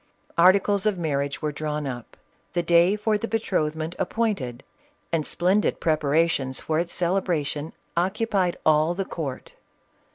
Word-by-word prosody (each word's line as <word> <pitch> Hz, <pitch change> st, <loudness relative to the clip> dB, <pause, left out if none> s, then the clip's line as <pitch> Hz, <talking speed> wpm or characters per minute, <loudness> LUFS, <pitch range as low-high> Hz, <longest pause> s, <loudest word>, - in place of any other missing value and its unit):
Articles 195 Hz, +4 st, +4 dB
of 205 Hz, -3 st, +1 dB
marriage 140 Hz, -4 st, -2 dB
were 150 Hz, -, 0 dB
drawn 150 Hz, 0 st, -3 dB
up; 120 Hz, -3 st, -7 dB, 0.4 s
the 175 Hz, -1 st, 0 dB
day 170 Hz, +3 st, +4 dB
for 210 Hz, 0 st, 0 dB
the 230 Hz, -, -3 dB
betrothment 160 Hz, -7 st, -1 dB
appointed, 180 Hz, -, -1 dB, 0.5 s
and 160 Hz, -3 st, 0 dB
splendid 190 Hz, +4 st, +1 dB
preparations 155 Hz, -3 st, +1 dB
for 155 Hz, 0 st, -1 dB
its 170 Hz, 0 st, -3 dB
celebration 170 Hz, -4 st, -1 dB, 0.2 s
occupied 190 Hz, 0 st, 0 dB
all 155 Hz, +2 st, +4 dB
the 195 Hz, +1 st, -2 dB
court. 145 Hz, -8 st, -6 dB
170 Hz, 130 wpm, -25 LUFS, 150-190 Hz, 0.5 s, Articles